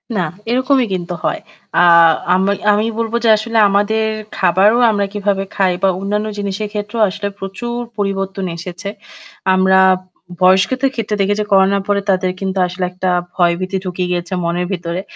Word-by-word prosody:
না 190 - +1 0.3
এরকমি 255 +1 +2
কিন্তু 175 -1 -3
হয়। - - -1 0.4
আ - - +6 0.5
আমি 190 +2 +2 0.2
আমি 210 +1 +2
বলব 230 0 -2
যে 230 - +3
আসলে 230 +2 -3
আমাদের 205 +2 +1 0.3
খাবারও 190 +5 +3
আমরা 200 -1 0
কিভাবে 200 -1 -1
খাই 190 -2 +2
বা 195 - +5
অন্যান্য 210 +2 -2
জিনিসের 205 +1 -3
ক্ষেত্রেও 210 +2 -3
আসলে 200 +1 -4
প্রচুর 235 +5 -5 0.2
পরিবর্তন 195 -1 -2
এসেছে। 180 +3 -7 0.6
আমরা 190 0 +4 0.6
বয়স্কদের 200 +9 +3
ক্ষেত্রে 220 -2 -2
দেখি 195 +1 +2
যে - - -2
করোনার 195 0 +3
পরে 200 -1 +1
তাদের 185 -1 +1
কিন্তু 195 0 -3
আসলে 180 +1 -5
একটা 185 +1 -2 0.3
ভয়ভীতি 185 +2 0
ঢুকিয়ে 180 0 -3
গিয়েছে 175 +1 -3
মনের 175 +1 -1
ভিতরে। 175 -1 -3
195 Hz, 155 wpm, -17 LUFS, 185-210 Hz, 0.6 s, আ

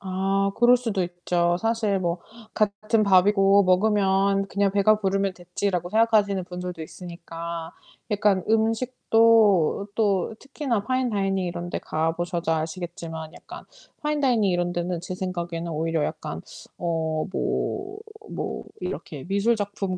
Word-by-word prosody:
아 195 +1 0
그럴 240 +1 +6
수도 225 -6 -2
있죠. 175 0 0
사실 225 -3 0
뭐 175 -1 -1 0.3
'같은 215 +1 +1
밥이고 195 +1 +5
먹으면 195 0 +3
그냥 200 0 +1
배가 205 +2 +4
부르면 195 -1 0
됐지.'라고 180 0 -3
생각하시는 215 -3 +3
분들도 180 -1 -6
있으니까 170 -1 -7 0.4
약간 205 -2 +2
음식도 225 -4 +3
또 205 -1 +1
특히나 270 -6 -2
파인 255 +1 0
다이닝 195 -3 0
이런 175 0 -4
데 - - -3
가보셔서 165 +1 -1
아시겠지만 160 0 -5
약간 - - -11 0.4
파인 300 0 0
다이닝 235 -8 +3
이런 175 0 0
데는 175 0 -2
제 180 +1 -5
생각에는 175 -2 -4
오히려 160 0 0
약간 - - -4 0.4
어 160 -2 -1
뭐, 395 - -2 0.3
뭐 - - -4 0.2
이렇게 160 -5 -5
미술 200 +5 +2
작품 200 -3 -3
195 Hz, 295 characters per minute, -25 LUFS, 175-210 Hz, 0.4 s, 그럴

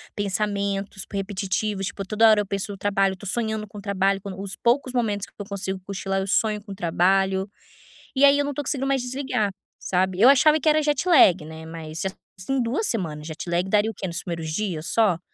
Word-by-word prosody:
pensamentos 200 -1 -2
repetitivos, 195 0 -2
tipo, 195 - -5
toda 220 +1 +5
hora 215 -1 +5
eu - - -4
penso 200 +1 -3
no 200 - -7
trabalho, 195 -1 +1
estou 195 +2 -9
sonhando 220 -1 -2
com 205 0 -10
trabalho, 195 0 0
quando 195 -1 -7
os 195 -1 -6
poucos 255 +2 +1
momentos 210 -5 0
que - - -23
eu 205 - -5
consigo 190 -2 -4
cochilar, 195 0 -2
eu 190 - -4
sonho 210 +1 +1
com 200 - -8
trabalho, 190 +2 +2 0.7
e 270 +2 +6
aí 280 0 +6
eu - - +2
não 290 - -2
estou 290 - -3
conseguindo 270 -1 -1
mais 270 -1 +1
desligar, 250 -5 -1 0.3
sabe. 185 0 0
Eu 240 - +8
achava 300 +3 +5
que 310 - -3
era 310 0 +4
jet 295 +3 0
lag, 190 - +6
né, 160 +1 -9
mas 160 -1 -7
já 190 - -1 0.3
fazem 260 +8 -1
2 265 - 0
semanas, 160 - -3
jet 160 +2 -7
lag, 175 +2 0
daria 210 +2 +2
o - - -14
quê, 190 - -4
nos 170 -1 -4
primeiros 165 -3 -4
dias 175 -4 -3
só? 210 -7 +2
200 Hz, 215 wpm, -24 LUFS, 190-225 Hz, 0.7 s, Eu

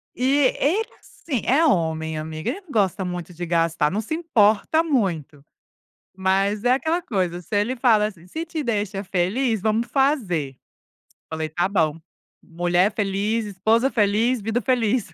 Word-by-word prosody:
E 250 - -2 0.3
ele, 390 +11 +1
assim, 265 -9 -5
é 295 +6 +3
homem, 160 - 0
amiga, 155 0 -4
ele 395 - -4
não 360 -7 -16
gosta 195 -3 +1
muito 180 0 -5
de 175 +1 -5
gastar, 165 -2 +1
não 210 +5 -2
se 225 - -5
importa 310 -2 +2
muito. 175 - -1 0.7
Mas 195 +2 +1
é 245 - +4
aquela 320 +6 -1
coisa, 180 - -2
se 210 - -7
ele 235 +5 -1
fala, 225 -4 +3
assim: 180 -5 -10
"Se 320 - -5
te 320 -2 -4
deixa 205 -5 -2
feliz, 205 +5 0
vamos 220 +3 0
fazer". 200 - 0 0.7
Falei: 160 0 -3
"Tá 175 +4 0
bom! 165 -5 0 0.4
Mulher 175 +4 +1
feliz, 205 +2 -1
esposa 220 +6 +1
feliz, 225 +3 +1
vida 225 +4 -1
feliz". 240 -6 0
205 Hz, 155 wpm, -23 LUFS, 175-245 Hz, 0.7 s, é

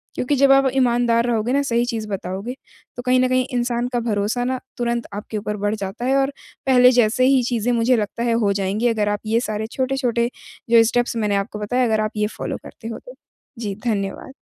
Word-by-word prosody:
क्योंकि 280 +3 0
जब 275 0 +5
आप 270 -1 +5
ईमानदार 240 -2 +2
रहोगे 235 +1 0
ना 280 - +3
सही 240 -3 +1
चीज़ 225 -3 -3
बताओगे, 195 +5 -4 0.4
तो - - -3
कहीं 255 0 +3
न 255 - +3
कहीं 255 0 +2
इंसान 240 0 0
का 240 - +1
भरोसा 225 +1 -1
ना 255 0 -1 0.2
तुरंत 235 -1 -1
आपके 210 +1 -5
ऊपर 210 0 -3
बढ़ 205 +1 -1
जाता 200 +4 -5
है 265 - +2
और 275 +1 +1 0.3
पहले 250 -1 +6
जैसे 245 +1 +3
ही 265 -1 +4
चीज़ें 240 0 0
मुझे 235 +2 +3
लगता 215 +2 -2
है 235 -1 +1
हो 200 - +2
जाएँगी 200 +4 0
अगर 215 -3 +1
आप 205 0 -1
ये 225 +2 +2
सारे 215 +1 -2
छोटे-छोटे 255 -3 0 0.4
जो 230 -1 +7
स्टेप्स 240 +1 0
मैंने 210 -2 0
आपको 200 +1 -3
बताए, 245 +4 +1
अगर 220 -1 +1
आप 215 +1 -1
ये 210 - +1
फ़ॉलो - - -5
करते 225 - -10
हो 230 - -5
तो। - - -13 0.5
जी, 205 -4 -3
धन्यवाद। 200 +2 -2
235 Hz, 215 wpm, -21 LUFS, 210-250 Hz, 0.5 s, जो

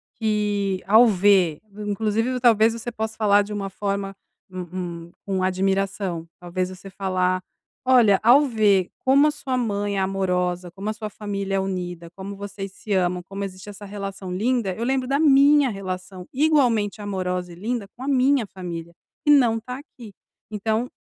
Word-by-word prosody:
que 205 -3 0
ao 220 +4 +7
ver 190 -5 +3
v 205 +1 -9
inclusive 220 +4 0
v 250 - -2
talvez 225 -2 +4
você 230 +1 -5
possa 220 -1 -4
falar 205 -2 +4
de 210 +1 -7
uma 195 -1 -3
forma, 195 0 -3 0.3
um 180 -2 -6
um - - -20
com 190 -2 -1
admiração, 190 -2 -1
talvez 180 +1 -3
você 185 +1 -10
falar: 185 -1 0 0.4
"Olha, 235 -7 +5
ao 260 +6 +6
ver 210 -7 +2
como 275 +3 +4
a 300 - +2
sua 270 -3 -3
mãe 205 -4 -1
é - - +1
amorosa, 180 -2 -1
como 195 +4 -5
a - - -1
sua 215 0 -6
família 200 -2 -4
é - - +2
unida, 180 -3 -4
como 195 +1 -7
vocês 195 -1 -7
se 215 - -10
amam, 180 -1 +1
como 195 +2 -6
existe 185 +1 -9
essa 205 0 -10
relação 195 -1 -6
linda, 220 0 0
eu 225 - -4
lembro 260 -1 0
da 275 +2 +1
minha 285 -1 +5
relação 185 -2 -6
igualmente 250 -8 +2
amorosa 180 -3 -3
e - - -10
linda 220 +3 -3
com 255 - -8
a - - -5
minha 270 -2 +3
família, 170 -3 -7 0.3
que - - +2
não 240 -6 +5
tá 250 +3 -7
aqui, 235 -8 -13 0.4
então 220 +3 -1
200 Hz, 175 wpm, -23 LUFS, 185-225 Hz, 0.4 s, ao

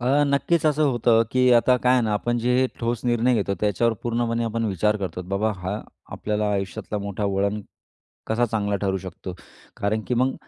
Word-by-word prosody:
अ, 135 +4 +3
नक्कीच 140 +4 +1
असं 155 0 +2
होतं, 115 -1 +3
की 125 0 +3
आता 120 +1 +5
काय 125 0 +2
आहे 125 - +4
ना, 110 -2 0
आपण 120 +3 0
जे 125 +2 +2
ठोस 120 0 -2
निर्णय 120 +1 +2
घेतो 100 -2 0
त्याच्यावर 105 +3 +2
पूर्णपणे 115 0 0
आपण 115 0 -2
विचार 105 +1 +1
करतो, 90 -2 -4
की 90 - -15
बाबा 100 +3 0
हा 95 +3 -4 0.3
आपल्याला 105 0 -1
आयुष्यातला 100 +1 -3
मोठा 100 0 -4
वळण 100 +1 0 0.7
कसा 115 +2 +1
चांगला 105 -2 -1
ठरू 95 -1 +1
शकतो. 90 0 -8 0.4
कारण 105 +2 0
की 125 - +1
मग 130 +2 +1
110 Hz, 190 wpm, -24 LUFS, 100-120 Hz, 0.7 s, आता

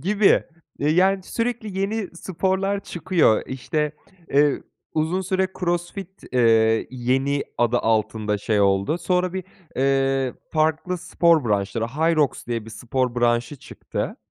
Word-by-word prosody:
Gibi. 205 +3 +3 0.3
Eee, 145 - 0
yani 190 +4 +3
sürekli 230 -2 -3
yeni 205 0 -1
sporlar 190 +3 -1
çıkıyor. 165 - +2
İşte, 150 +3 -2 0.4
eee, 145 +1 +3 0.3
uzun 160 +4 0
süre 190 0 0
CrossFit 175 +2 -3
eee, 115 -2 +4
yeni 130 +3 0
adı 120 +1 +3
altında 110 -2 0
şey 105 +1 0
oldu. 100 - +2
Sonra 180 0 0
bir, 190 -1 -4 0.3
eee, 135 -1 +1 0.2
farklı 160 +3 +1
spor 165 -3 +3
branşları, 105 +1 0
Hyrox 155 +2 +1
diye 115 -2 -3
bir 115 - -10
spor 125 +2 -2
branşı 120 +3 +1
çıktı. - - -5
145 Hz, 125 wpm, -23 LUFS, 120-180 Hz, 0.4 s, eee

